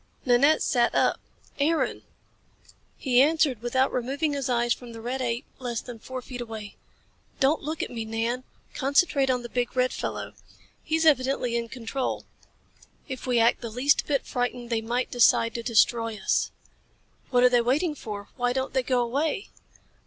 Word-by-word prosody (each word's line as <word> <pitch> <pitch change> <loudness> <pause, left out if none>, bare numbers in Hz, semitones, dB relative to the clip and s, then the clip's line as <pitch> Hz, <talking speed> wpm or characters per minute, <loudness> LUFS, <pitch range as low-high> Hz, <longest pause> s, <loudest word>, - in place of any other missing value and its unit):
Nanette 275 +5 +4
sat 240 -2 +2
up. - - +2 0.4
"Aaron!" 315 +3 +1 1.0
He 250 -2 +3
answered 290 -5 +2
without 260 +2 +1
removing 275 +5 -1
his 275 -2 -2
eyes 240 -1 +2
from 240 -2 -10
the 225 - -8
red 250 +3 -3
ape 240 +2 -2
less 240 -3 -3
then 240 -2 -9
four 255 +2 -7
feet 250 0 -7
away. 220 -3 -7 0.6
"Don't 280 +4 +3
look 310 +2 -3
at - - -5
me, 230 -2 -4
Nan. 225 +3 -2 0.3
Concentrate 275 0 +2
on 250 -1 +1
the - - -5
big, 245 +1 -2
red 255 0 +2
fellow. - - -4 0.5
He's 320 +1 0
evidently 260 -4 +2
in 235 -1 -2
control. 255 +2 -3 0.8
If 260 -2 -6
we 250 -1 +2
act 230 0 +3
the 235 - -5
least 250 +6 +2
bit 280 -3 0
frightened 245 -1 -3
they 225 -1 +1
might 240 +3 -2
decide 230 -1 +4
to 235 - -3
destroy 230 -1 +2
us." 195 - +1 0.8
"What 245 -1 +3
are 250 - +7
they 245 -1 +4
waiting 295 +8 +1
for? 205 -7 -7
Why 245 -1 +1
don't 265 0 -2
they 260 - +2
go 250 -1 +1
away?" 290 +10 -1
250 Hz, 170 wpm, -26 LUFS, 235-270 Hz, 1.0 s, are